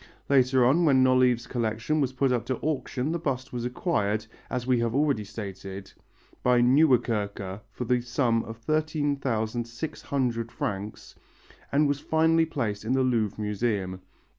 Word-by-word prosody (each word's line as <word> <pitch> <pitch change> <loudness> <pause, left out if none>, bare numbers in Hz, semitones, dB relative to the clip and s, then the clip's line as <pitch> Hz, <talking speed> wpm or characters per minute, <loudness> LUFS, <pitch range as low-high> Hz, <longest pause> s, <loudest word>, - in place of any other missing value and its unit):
Later 130 -2 +4
on, 145 +8 +4
when 135 -5 +5
Nolive's 130 -2 +3
collection 115 +5 -1
was 135 -2 0
put 130 0 +1
up 120 -2 +1
to 130 - -1
auction 140 -1 -2
the 170 - -1
bust 135 -4 -3
was 120 -1 -3
acquired, 110 - -1 0.2
as 125 -1 -3
we 125 -2 +2
have 115 0 -1
already 140 -6 +2
stated, 100 -2 -8 0.5
by 125 -1 +4
Nieuwerkerque 115 -7 +2
for 125 +4 -6
the 125 +1 +2
sum 120 -1 +1
of 115 0 -8
13,600 130 -3 -2
francs 100 +1 -5 0.6
and 145 +2 +3
was 145 0 0
finally 160 +1 +2
placed 115 -10 -3
in 115 +4 0
the 130 0 +3
Louvre 110 -5 0
Museum. 105 -3 -2
125 Hz, 145 wpm, -27 LUFS, 110-140 Hz, 0.6 s, when